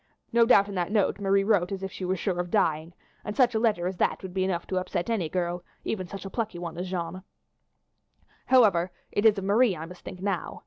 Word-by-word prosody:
No 230 0 +5
doubt 200 -5 +6
in 200 - -7
that 180 0 -2
note 210 -2 +1
Marie 195 0 +2
wrote 195 -4 +2
as 195 -1 -4
if 190 - -4
she 185 - -6
were 185 +1 0
sure 180 0 -2
of 175 0 -2
dying, 165 -4 +1 0.3
and 210 - -5
such 250 -2 +4
a 220 - +1
letter 215 -6 +1
as 185 0 -3
that - - 0
would 185 -1 -7
be 190 0 0
enough 180 -2 -1
to 185 - -3
upset 185 +3 -3
any 185 -9 0
girl, 175 0 -2 0.2
even 185 -4 -3
such 195 +2 -8
a - - -5
plucky 220 -6 -3
one 170 -2 -6
as 180 0 -4
Jeanne. 180 0 -4 1.3
"However, 200 -9 +4 0.2
it 210 +2 +3
is 215 -1 +4
of 195 - -3
Marie 205 +1 +3
I 160 - -6
must 180 +1 -12
think 180 - -8
now. 195 -2 -3
190 Hz, 240 wpm, -27 LUFS, 175-205 Hz, 1.3 s, doubt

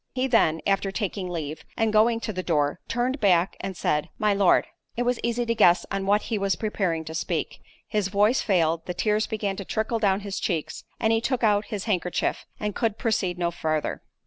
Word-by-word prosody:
He 255 0 +1
then, 195 -11 +3
after 195 0 +1
taking 195 -2 -3
leave, 155 -3 -5
and 225 -1 +1
going 225 +2 +4
to 215 - -3
the 185 - -3
door—turned 185 - -1
back 185 -4 +3
and 190 -2 -5
said, 150 -1 0
"My 210 -1 +2
Lord,"— 195 -2 +4 0.3
It 245 - +1
was 245 0 0
easy 235 +1 0
to 230 - +1
guess 175 -6 +4
on 195 0 -2
what 205 +1 +3
he 220 -3 -2
was 195 -1 +1
preparing 185 -7 -1
to 160 - -7
speak—his 200 +4 -3
voice 205 +5 +3
failed, 165 -4 +1
the 180 - -3
tears 215 +2 +1
began 205 -3 -2
to 195 - -4
trickle 220 +4 -1
down 200 -2 +2
his 200 -1 -4
cheeks, 165 -6 -3
he 225 0 +2
took 250 0 -1
out 210 -1 +3
his 210 -4 -4
handkerchief, 180 -5 -1
and 210 -1 -2
could 225 -1 -1
proceed 190 -6 0
no 170 -1 0
farther. 155 -2 -2
200 Hz, 200 wpm, -25 LUFS, 175-220 Hz, 0.3 s, going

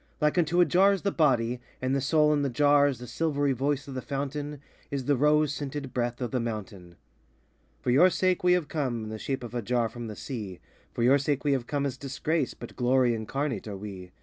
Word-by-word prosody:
Like 150 -1 +2
unto 175 0 +2
a - - +6
jar 190 +3 +4
is 195 - -3
the 200 - +1
body, 125 -7 +1 0.2
And 130 +1 0
the 140 - 0
soul 150 +2 +3
in 145 - +1
the 140 - 0
jar 145 +2 +4
Is 140 -3 -1
the 125 - -9
silvery 145 0 0
voice 140 +2 -1
of 135 - -7
the 130 - -4
Fountain, 145 +1 -4 0.3
Is 140 -2 -3
the 145 - +3
rose 150 +2 +3
scented 140 -2 -5
breath 120 0 -2
of 125 - -2
the 130 - 0
Mountain, 105 -6 -6 0.9
For 125 - 0
your 165 +9 +6
sake 185 0 +1
we 180 0 +5
have 180 -4 +1
come 130 -8 -2
In 110 - -6
the 110 - -6
shape 135 +1 -3
of 120 - -8
a 120 - -2
jar 120 +1 0
from 120 +1 -7
the 105 - -7
Sea; 105 -10 -6 0.3
For 115 - -2
your 135 +4 +5
sake 140 0 -1
we 145 - +2
have 130 -3 0
come 145 -1 -1
as 130 -2 -3
Disgrace, 140 +5 -2
But - - -10
glory 125 -1 +3
incarnate 125 +4 -3
are 100 -2 -5
we. 95 -3 -8
135 Hz, 235 wpm, -28 LUFS, 120-150 Hz, 0.9 s, a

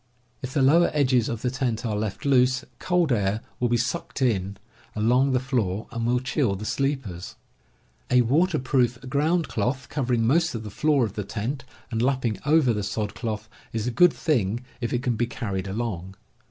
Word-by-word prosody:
If 130 0 -6
the 140 - +3
lower 165 +6 +5
edges 130 -5 +3
of 115 -2 -4
the 125 - 0
tent 125 -3 -2
are 110 -2 -1
left 105 +2 -3
loose, 130 0 +3
cold 180 -4 +1
air 105 -1 +1 0.2
will 120 - +1
be 120 - +3
sucked 140 +8 -3
in 100 -5 0 0.4
along 125 +6 +3
the 130 - +2
floor 115 -6 -1
and 115 -1 -2
will 125 +1 +2
chill 130 -4 0
the 105 +3 -6
sleepers. 120 -6 -2 0.7
A 125 0 +5
waterproof 130 -3 +2
ground 155 +5 +1
cloth, 125 +5 -2
covering 120 -5 0
most 160 +4 +2
of 110 - -4
the 105 - -7
floor 145 0 +2
of 105 - -6
the 105 - -3
tent 115 +8 -4 0.3
and 115 -1 -1
lapping 125 -4 0
over 150 -5 +4
the 105 - -2
sod 105 0 -3
cloth, 110 -2 -4 0.3
is 110 -1 -2
a 125 - 0
good 175 +10 +6
p. - - -13
thing 120 - 0 0.2
if 120 - -2
it 120 +1 -1
can 125 -3 +1
be 120 +2 0
carried 100 -6 -4
along. 95 -3 -4
120 Hz, 195 wpm, -25 LUFS, 110-135 Hz, 0.7 s, good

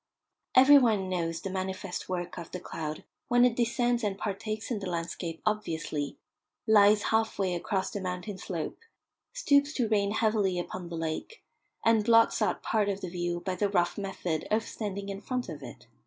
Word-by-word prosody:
Every 280 +3 +9
one 215 -7 +2
knows 165 -2 -2
the 195 - -4
manifest 190 -1 -4
work 175 -1 -3
of 170 - -8
the 180 - -5
cloud 155 -3 -5 0.2
when 245 0 +5
it 245 -2 +2
descends 240 0 +1
and 200 -2 -1
partakes 215 +3 -4
in 225 - -1
the 195 -2 -4
landscape 165 -1 -4
obviously, 165 -8 -2 0.5
lies 210 -1 +6
half 220 0 +2
way 190 -2 0
across 190 +2 -1
the 200 - -4
mountain 185 +2 -4
slope, 170 -4 -4 0.5
stoops 285 +1 +3
to 245 -6 0
rain 205 -2 +2
heavily 215 -4 +1
upon 175 0 -5
the 170 - -5
lake, 165 - -4 0.4
and 225 -1 +4
blots 230 0 +4
out - - 0
part 210 -2 +1
of 200 0 -2
the 180 - -4
view 175 0 -2
by 185 - -2
the 200 +2 0
rough 175 -3 +1
method 185 -5 -3
of 220 +1 +2
standing 200 -3 -5
in 195 0 -5
front 250 +3 -3
of - - -7
it. - - -10
200 Hz, 185 wpm, -29 LUFS, 175-220 Hz, 0.5 s, Every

